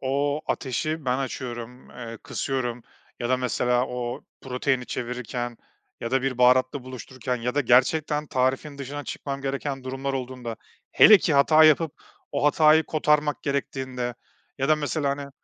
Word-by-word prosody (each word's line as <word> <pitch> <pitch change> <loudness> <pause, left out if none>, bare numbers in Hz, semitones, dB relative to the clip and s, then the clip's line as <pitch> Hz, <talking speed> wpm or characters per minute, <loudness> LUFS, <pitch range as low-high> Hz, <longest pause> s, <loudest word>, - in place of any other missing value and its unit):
o 140 +2 0
ateşi 155 +4 -2
ben 125 0 +1
açıyorum, 125 -2 -6
eee, 115 -2 -8
kısıyorum 125 -3 -3 0.4
ya 120 - -2
da, 130 - +3
mesela, 125 0 +1
o 125 -1 -4 0.2
proteini 130 0 -1
çevirirken 120 0 -4 0.4
ya 115 - -4
da 130 0 +1
bir 130 -2 -2
baharatla 130 +2 +4
buluştururken 130 0 -5
ya 125 +2 -3
da 145 - +3
gerçekten 150 +4 +2
tarifin 135 +2 -1
dışına 140 +1 -6
çıkmam 140 -1 -5
gereken 135 0 -3
durumlar 135 +1 -3
olduğunda, 125 -3 -5 0.4
hele 210 -1 +9
ki 160 - 0
hata 155 +3 +6
yapıp 155 0 +4 0.4
o 140 0 -1
hatayı 155 +1 +5
kotarmak 150 -1 +1
gerektiğinde 130 -3 -3 0.4
ya 135 +1 0
da, 155 - +5
mesela, 145 -1 -1
hani, 140 0 -5
130 Hz, 150 wpm, -25 LUFS, 125-145 Hz, 0.4 s, hele